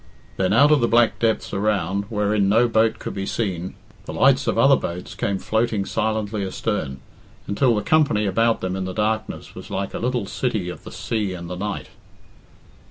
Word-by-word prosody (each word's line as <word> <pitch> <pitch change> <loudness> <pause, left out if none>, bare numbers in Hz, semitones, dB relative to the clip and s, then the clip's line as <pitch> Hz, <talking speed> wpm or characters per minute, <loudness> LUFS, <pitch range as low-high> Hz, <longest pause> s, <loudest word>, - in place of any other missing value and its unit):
Then 95 0 +1
out 140 +8 +6
of 150 -4 +5
the 120 - +3
black 120 0 +3
depths 115 -2 0
around, 100 -1 0
wherein 105 -1 +1
no 115 +4 +4
boat 110 -1 +2
could - - -6
be 95 0 -4
seen, 95 -5 -3 0.3
the - - -6
lights - - +3
of - - +1
other - - +6
boats 90 +2 -5
came 100 -1 -1
floating 110 0 0
silently 110 -1 -1
astern, 95 -8 -3 0.4
until 115 +4 +2
the 105 - -1
company 140 -9 +3
about 115 +4 +2
them 95 0 -2
in 95 -1 -3
the 95 - -5
darkness 110 0 -2
was - - -10
like 95 0 -3
a - - -3
little 120 -2 -1
city 105 -4 -2
of 90 - -9
the - - -8
sea 105 -5 -2
and 85 0 -8
the - - -3
night. 100 +2 -4
105 Hz, 190 wpm, -22 LUFS, 95-115 Hz, 0.4 s, out